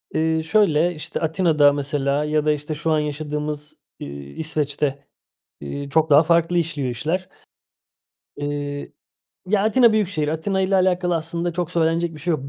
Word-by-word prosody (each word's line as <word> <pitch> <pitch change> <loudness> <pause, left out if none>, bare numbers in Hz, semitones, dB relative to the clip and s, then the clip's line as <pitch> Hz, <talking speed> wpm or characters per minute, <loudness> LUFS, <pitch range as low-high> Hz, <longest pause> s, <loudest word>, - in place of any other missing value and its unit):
Iıı, 160 0 +1
şöyle, 175 -2 +2
işte, 155 - -5
Atina'da 160 -3 +3
mesela 140 0 -1
ya 150 0 0
da, 155 - +4
işte, 150 +1 -5
şu 160 +2 -2
an 155 - +3
yaşadığımız, 150 0 -4 0.3
ııı, - - -5
İsveç'te, 140 - -3 0.6
ııı, 140 - -5
çok 155 +2 +2
daha 145 +2 +7
farklı 170 +1 +2
işliyor 150 -5 -1
işler. 160 +10 -2 1.1
Iıı, 145 0 -4 0.6
ya 200 0 +2
Atina 230 +2 +5
büyük 215 -3 +2
şehir. 155 -6 -2
Atina'yla 190 +4 0
alakalı 180 -1 +1
aslında 170 +2 -2
çok 175 -1 -3
söylenecek 165 0 0
bir 150 - -11
şey 175 +4 -2
yok. 140 -4 -2
155 Hz, 155 wpm, -22 LUFS, 145-170 Hz, 1.1 s, daha